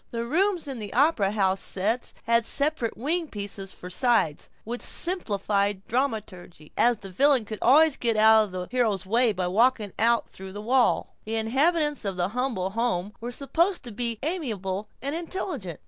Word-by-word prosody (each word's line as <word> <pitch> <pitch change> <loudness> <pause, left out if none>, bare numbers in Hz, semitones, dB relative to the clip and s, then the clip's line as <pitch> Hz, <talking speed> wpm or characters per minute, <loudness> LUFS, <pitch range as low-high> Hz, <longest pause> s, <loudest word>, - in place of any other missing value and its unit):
The 230 0 -4
rooms 355 +5 +1
in 265 -4 -5
the 210 -2 -5
op'ra 260 -7 +3
house 195 -2 +1
sets 215 +7 -1
had 230 0 +3
separate 280 -2 0
wing 320 +7 -1
pieces 200 -4 -6
for 180 - -10
sides, 220 - +1
which 240 +2 -5
simplified 205 - -1
dramaturgy, 210 - -3
as 240 -1 +3
the 195 -2 -10
villain 270 +3 +3
could 215 0 -7
always 300 +3 +5
get 230 -2 0
out 220 0 +6
of 200 - -11
the 180 -1 -5
hero's 220 -7 0
way 230 +4 +3
by 185 -3 -2
walking 215 +2 +2
out 230 +1 +3
through 190 0 -10
the 205 - -7
wall. 245 +3 +1
The 220 +1 -3
inhabitants 290 +6 +1
of 195 -2 -3
the 180 +1 -1
Humble 230 -5 -2
Home 210 -3 -1
were 240 - -4
supposed 335 +8 0
to 240 - -8
be 235 +1 -3
amiable 215 - -2 0.2
and 280 +1 -2
intelligent. 325 - -4
230 Hz, 175 wpm, -26 LUFS, 200-270 Hz, 0.2 s, out